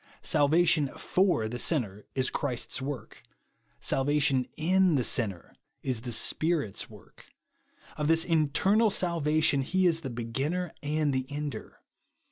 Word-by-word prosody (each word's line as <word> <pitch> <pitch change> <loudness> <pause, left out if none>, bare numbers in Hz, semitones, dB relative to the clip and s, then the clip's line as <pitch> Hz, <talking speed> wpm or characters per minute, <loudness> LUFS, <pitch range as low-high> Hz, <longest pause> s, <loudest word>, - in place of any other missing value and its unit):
Salvation 155 0 +3
/or 180 - 0
the 120 +2 -5
sinner 105 - -1
is 130 -1 0
Christ's 130 -2 -2
work; 135 -4 -6 0.6
salvation 135 -2 +1
in 185 +1 +3
the 130 - +1
sinner 100 -8 -1 0.3
is 125 -4 -2
the 120 - -6
Spirit's 150 - 0
work. - - -17 0.7
Of 150 - -1
this 165 +1 +3
internal 180 +7 +2
salvation 155 -6 +2
he 185 +7 0
is 165 -2 +2
the 135 - -5
beginner 135 +9 -3
and 150 0 0
the 130 0 -2
ender. 145 -5 -6
145 Hz, 125 wpm, -28 LUFS, 130-165 Hz, 0.7 s, Salvation